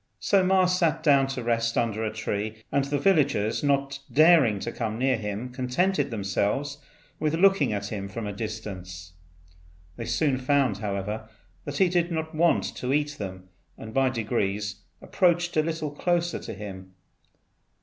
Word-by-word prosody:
So 195 -2 +3
Ma 185 0 +4
sat 170 -3 +1
down 140 -3 +5
to 135 -2 -4
rest 115 0 0
under 115 -2 0
a 110 - -1
tree, 110 0 -4
and 140 -1 +2
the 145 +1 -1
villagers, 140 - +2
not 140 -1 +1
daring 155 - +5
to 120 - -3
come 110 -2 -3
near 130 +1 +2
him, 105 +3 -4
contented 140 +6 0
themselves 115 +7 -1 0.4
with 155 0 0
looking 190 - +4
at 100 0 -3
him 100 -2 -5
from 110 +3 -5
a 105 - -4
distance. 95 -6 -7 0.8
They 115 - -5
soon 140 +1 +1
found, 130 -6 +1
however, 105 +1 -4 0.4
that 145 0 -4
he 190 - +5
did 175 -1 +1
not 160 -1 -3
want 165 +1 +3
to 125 - -2
eat 145 +1 0
them, 95 -2 -7 0.3
and 110 0 -9
by 135 -1 +3
degrees 105 -4 -2 0.3
approached 175 -2 +1
a 155 - +4
little 160 -1 -3
closer 175 +3 0
to - - -7
him. 95 -3 -9
130 Hz, 160 wpm, -26 LUFS, 105-155 Hz, 0.8 s, down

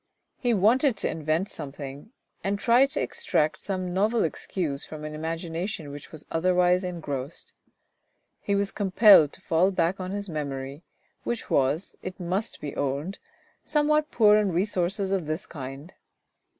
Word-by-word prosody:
He 245 - +1
wanted 235 +4 +3
to - - -1
invent 160 +4 -1
something, 140 - -8 0.3
and 200 +1 0
tried 245 +5 +4
to - - -3
extract 155 0 0
some 185 -2 -3
novel 215 +5 +2
excuse 155 -3 -2
from 155 -1 -8
an 155 - -5
imagination 165 +1 -4
which 145 0 -10
was 155 -2 -10
otherwise 180 +2 +3
engrossed. 155 -6 -5 0.9
He 200 - -1
was 200 0 0
com 200 -2 -2
pelled 195 -6 +8
to - - -11
fall 175 +2 +3
back 185 0 0
on 185 0 -4
his 200 +1 -3
memory, 140 -3 -5 0.4
which 240 -1 -4
was, 140 +6 +1
it 185 +1 -7
must 185 +5 -2
be 145 -2 -6
owned, 145 +7 -2 0.4
somewhat 300 0 +2
poor 210 -2 +5
in 210 -3 +2
resources 190 +1 0
of 185 -5 0
this 155 +6 -3
kind. 140 +2 -8
180 Hz, 150 wpm, -26 LUFS, 155-200 Hz, 0.9 s, pelled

